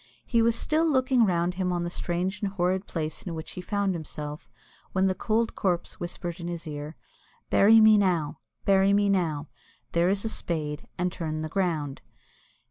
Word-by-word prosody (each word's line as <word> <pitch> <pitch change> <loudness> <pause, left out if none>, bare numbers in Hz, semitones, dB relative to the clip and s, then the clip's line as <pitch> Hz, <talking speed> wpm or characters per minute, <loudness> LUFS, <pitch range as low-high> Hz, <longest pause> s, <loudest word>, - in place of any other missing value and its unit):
He 230 -2 +2
was 230 0 +3
still 315 +6 +1
looking 255 -4 +3
round 175 -1 +1
him 180 0 -1
on 175 -1 -1
the 175 - -3
strange 180 +3 -2
and 200 -2 -1
horrid 185 +1 0
place 155 -2 -3
in 170 -3 -5
which 160 0 -6
he 180 - -6
found 200 0 0
himself, 150 -5 -6 0.4
when 190 0 +2
the 190 - +2
cold 225 +4 0
corpse 180 -3 -1
whispered 175 0 -5
in 170 - -5
his 170 -1 -5
ear, 150 +1 -6 0.6
"Bury 220 +3 +7
me 215 -1 +7
now, 165 -7 0 0.3
bury 195 0 +4
me 205 0 +3
now; 160 -6 0 0.4
there 170 +1 +3
is 200 +2 0
a - - 0
spade 150 -7 -3
and 180 0 0
turn 155 -3 -4
the 155 - -4
ground." 160 -6 -1
180 Hz, 185 wpm, -27 LUFS, 165-200 Hz, 0.6 s, Bury